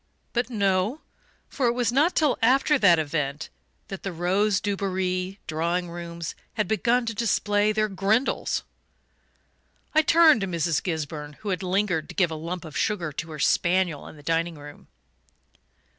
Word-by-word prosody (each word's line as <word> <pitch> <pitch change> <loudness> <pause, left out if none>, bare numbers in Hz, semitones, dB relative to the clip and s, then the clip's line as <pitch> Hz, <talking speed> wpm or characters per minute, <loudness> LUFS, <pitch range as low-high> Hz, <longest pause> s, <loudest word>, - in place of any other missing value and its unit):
But 240 +1 0
no 200 +4 0 0.5
for 265 -3 -1
it 235 - +2
was 245 -1 0
not 295 +8 +2
till 300 -5 +3
after 270 +5 +4
that 180 -6 +6
event 150 -1 -2 0.4
that 195 - -6
the 195 - -4
rose 190 +4 +1
Dubarry 190 -2 -2
drawing 170 +3 -1
rooms 170 -1 -6 0.2
had 215 -4 0
begun 235 +4 +1
to 230 - -2
display 205 -1 +1
their 215 0 +1
"Grindles." 205 +6 0 1.3
I 315 - +6
turned 315 -6 +5
to 195 - -1
Mrs. 170 -3 0
Gisburn, 150 -3 -4
who 210 - -4
had 185 -1 -1
lingered 185 -4 0
to - - -9
give 175 -4 +2
a - - -3
lump 170 +3 -5
of 155 - -10
sugar 180 -7 -1
to 165 +3 -6
her 155 - -7
spaniel 175 +1 +1
in - - -11
the 145 - -15
dining 165 +2 0
room. 145 0 -12
185 Hz, 160 wpm, -25 LUFS, 165-215 Hz, 1.3 s, that